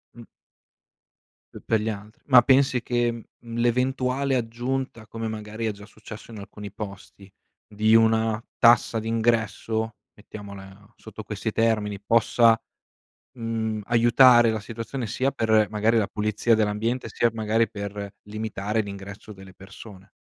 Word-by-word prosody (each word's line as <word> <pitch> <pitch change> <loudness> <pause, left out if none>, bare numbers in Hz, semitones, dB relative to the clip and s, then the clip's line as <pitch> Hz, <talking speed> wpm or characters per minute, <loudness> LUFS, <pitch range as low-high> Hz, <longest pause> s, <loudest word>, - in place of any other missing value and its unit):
Mh. 120 -1 -12 1.3
P - - -10
pe' 110 - +2
gli 110 +2 -2
altri. 105 +1 -8
Ma 130 -3 +7
pensi 130 -2 +3
che, 120 -1 0
mhmm, 115 -1 -8 0.2
mhmm, 115 -1 -8
l'eventuale 130 +3 0
aggiunta, 120 0 -3
come 115 0 -5
magari 110 +1 -5
è 110 - 0
già 100 0 -12
successo 110 +1 -12
in 110 - -9
alcuni 100 0 -9
posti, 100 -1 -10 0.3
di 110 +1 +2
una 110 0 +3 0.2
tassa 120 -1 +4
d'ingresso, 110 0 -1 0.2
mettiamola 100 -1 -12
sotto 110 0 -10
questi 105 +1 -4
termini, 105 -3 0
possa, 115 +1 +3 0.8
mhmm, 110 -2 -3
aiutare 120 +1 +6
la 110 -1 -1
situazione, 115 +4 -6
sia 130 +6 -1
per, 110 -4 +2
magari, 110 +2 +1
la 105 -3 +1
pulizia 105 +2 +1
dell'ambiente, 110 +3 -1
sia 120 +2 +1
magari 110 0 0
per 100 -1 -6
limitare 105 0 -3
l'ingresso 100 0 -9
delle 95 -2 -13
persone? 95 +1 -13
110 Hz, 135 wpm, -24 LUFS, 105-115 Hz, 1.3 s, Ma